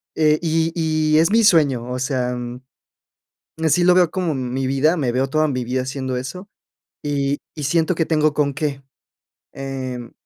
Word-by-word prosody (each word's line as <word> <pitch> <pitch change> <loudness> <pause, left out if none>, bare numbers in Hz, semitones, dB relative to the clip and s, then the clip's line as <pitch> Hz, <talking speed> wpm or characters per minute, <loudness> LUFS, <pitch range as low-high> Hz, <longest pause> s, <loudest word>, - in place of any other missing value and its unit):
eh 155 -1 +3
y 165 0 +1
y 155 -2 +1
es 165 - +4
mi 225 +1 +4
sueño, 145 - +3
o 125 - -3
sea, 125 -1 -1
mm, 120 0 -6 1.0
así 175 +3 +3
lo 180 0 +6
veo 180 -2 +4
como 175 -2 -1
mi 130 0 -2
vida, 135 +5 +2
me 135 -8 0
veo 130 +2 0
toda 155 +2 +2
mi 125 -3 -2
vida 130 +2 -1
haciendo 130 0 -4
eso, 130 +10 -6 0.6
y 140 -1 -1 0.2
y 150 - -6
siento 165 +4 +1
que 165 - 0
tengo 155 -2 +2
con 140 -1 +1
qué. 140 -2 -3 0.7
Em, 130 -3 -6
145 Hz, 175 wpm, -21 LUFS, 130-160 Hz, 1.0 s, lo